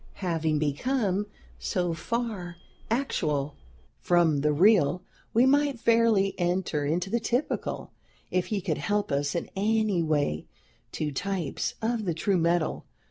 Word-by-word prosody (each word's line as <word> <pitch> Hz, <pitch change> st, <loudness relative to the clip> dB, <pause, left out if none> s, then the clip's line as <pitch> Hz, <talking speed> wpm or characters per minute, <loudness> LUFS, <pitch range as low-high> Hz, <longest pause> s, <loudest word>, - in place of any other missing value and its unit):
Having 160 Hz, -3 st, +1 dB
become 200 Hz, -, 0 dB, 0.3 s
so 175 Hz, -2 st, -1 dB
far 195 Hz, -1 st, -3 dB, 0.3 s
actual, 150 Hz, -, 0 dB, 0.5 s
from 170 Hz, -4 st, +3 dB
the 150 Hz, +1 st, +2 dB
real, 180 Hz, +1 st, +4 dB, 0.3 s
we 235 Hz, +3 st, +4 dB
might 280 Hz, -1 st, +3 dB
fairly 225 Hz, -4 st, +3 dB
enter 175 Hz, -4 st, 0 dB
into 175 Hz, +5 st, -1 dB
the 235 Hz, -, +2 dB
typical, 245 Hz, +5 st, -2 dB, 0.4 s
if 185 Hz, -1 st, 0 dB
he 210 Hz, -3 st, -1 dB
could 170 Hz, -5 st, -2 dB
help 205 Hz, -4 st, -1 dB
us 140 Hz, +2 st, 0 dB
in 170 Hz, -, -2 dB
any 210 Hz, -2 st, +1 dB
way 145 Hz, -, 0 dB, 0.5 s
to 150 Hz, -1 st, -2 dB
types 185 Hz, +2 st, -2 dB
of 225 Hz, -1 st, 0 dB
the 170 Hz, -3 st, -1 dB
true 190 Hz, +4 st, +1 dB
metal. 170 Hz, -1 st, 0 dB
180 Hz, 135 wpm, -27 LUFS, 160-220 Hz, 0.5 s, real